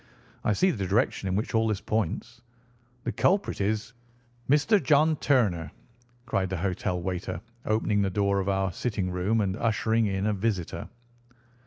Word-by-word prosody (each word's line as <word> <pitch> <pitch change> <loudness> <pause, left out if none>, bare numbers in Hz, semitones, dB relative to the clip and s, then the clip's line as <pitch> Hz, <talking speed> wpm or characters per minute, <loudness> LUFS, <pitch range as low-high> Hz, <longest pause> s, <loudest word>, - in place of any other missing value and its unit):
I 105 - +2
see 185 - +3
the 100 - -3
direction 100 0 +1
in 95 - 0
which 105 - -2
all 110 0 +3
this 105 -3 0
points. 110 +2 -2 0.6
The - - -1
culprit 195 - +1
is—" 110 +3 -1 0.6
"Mr. 165 +9 +4
John 155 +1 +4
Turner," 95 - +1 0.5
cried 100 -5 0
the 95 - -2
hotel 90 0 -1
waiter, 90 +1 -3 0.3
opening 110 -1 +2
the 100 - +1
door 100 +1 +1
of 95 0 -1
our 95 -1 +1
sitting 95 -1 -2
room, 95 +5 +1
and 95 -2 0
ushering 115 0 +1
in 95 0 -1
a 105 - +2
visitor. 100 -4 -2
105 Hz, 160 wpm, -27 LUFS, 95-115 Hz, 0.6 s, Mr